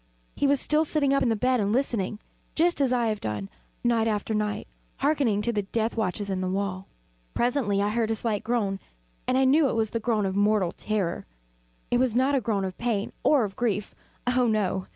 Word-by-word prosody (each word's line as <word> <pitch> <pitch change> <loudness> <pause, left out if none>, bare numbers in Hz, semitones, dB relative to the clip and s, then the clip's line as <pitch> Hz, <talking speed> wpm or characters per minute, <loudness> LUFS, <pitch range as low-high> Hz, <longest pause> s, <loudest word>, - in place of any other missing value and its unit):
He 285 - +1
was 280 0 +3
still 305 +3 +3
sitting 290 -3 +1
up 275 - +2
in - - +2
the 225 - +2
bed 250 +3 +1
listening; 215 -2 0 0.4
just 340 -1 +2
as 265 -2 +2
I 240 -2 +2
have 215 -1 -3
done, 105 -2 -4 0.3
night 230 -2 +2
after 215 0 -1
night, 210 -1 -2 0.3
hearkening 270 -8 +1
to 235 - 0
the 210 - +1
death 220 +3 -2
watches 205 -2 -1
in 190 -1 -2
the 185 - -1
wall. 190 0 -2 0.5
Presently 235 -5 +1
I 205 - +1
heard 225 0 0
a 225 - +1
slight 220 -1 -2
groan, 215 -4 0 0.5
and 255 - +2
I 265 - +4
knew 280 +2 +4
it - - -2
was 220 -2 0
the 230 - -1
groan 220 -2 0
of 190 0 -2
mortal 205 -3 +2
terror. 200 -5 -2 0.6
It 245 - +3
was 250 -3 +1
not 260 +3 +3
a 270 - +2
groan 205 -3 0
of 185 -1 -6
pain 225 -4 -1
or 285 -5 +4
of 195 -2 -4
grief 210 -4 -1 0.3
oh, 250 0 +2
no! 200 -4 0
220 Hz, 215 wpm, -26 LUFS, 200-250 Hz, 0.6 s, I